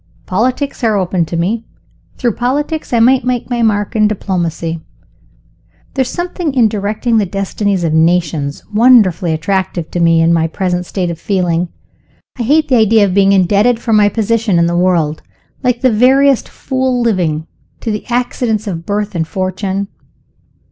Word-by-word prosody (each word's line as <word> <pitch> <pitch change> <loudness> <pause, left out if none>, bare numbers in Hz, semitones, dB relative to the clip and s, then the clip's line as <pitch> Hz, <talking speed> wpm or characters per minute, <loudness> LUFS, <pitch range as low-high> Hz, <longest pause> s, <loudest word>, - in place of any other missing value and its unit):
Politics 255 +8 -1
are 220 -3 +2
open 185 -2 0
to 170 - -4
me. 210 +7 -1 0.5
Through 240 - 0
politics, 290 +8 -2
I 235 - +2
might 250 +2 +4
make 250 -1 -2
my 240 -1 0
mark 210 0 0
in 215 -1 +4
diplomacy. 170 -5 -3 1.1
There 270 - 0
is 255 - -1
something 350 -4 -3
in 240 -4 +4
directing 215 +3 -1
the 205 - 0
destinies 195 0 -2
of 160 -2 0
nations 160 -3 0
wonderfully 210 -7 +4
attractive 175 +1 -2
to 175 - -2
me 165 -1 +3
in 165 +1 +3
my 165 -1 +2
present 180 +1 -2
state 180 -3 -2
of 165 - -7
feeling. 180 -3 0 0.7
I - - -1
hate 300 +6 +2
the 255 - +3
idea 220 -1 +4
of 190 - -2
being 195 0 +4
indebted 205 +5 +3
for 230 -1 -1
my 210 -1 +5
position 220 -2 0
in 170 - +3
the 170 0 0
world, 170 -4 +1 0.4
like 250 -2 0
the 255 - +3
veriest 265 +4 +3
fool 260 -1 -2
living, 175 -9 0 0.4
to 225 - -2
the 210 - -5
accidents 240 -3 -1
of 170 -5 -5
birth 205 0 -2
and 165 -3 -2
fortune. 190 +2 -3
205 Hz, 170 wpm, -14 LUFS, 175-240 Hz, 1.1 s, my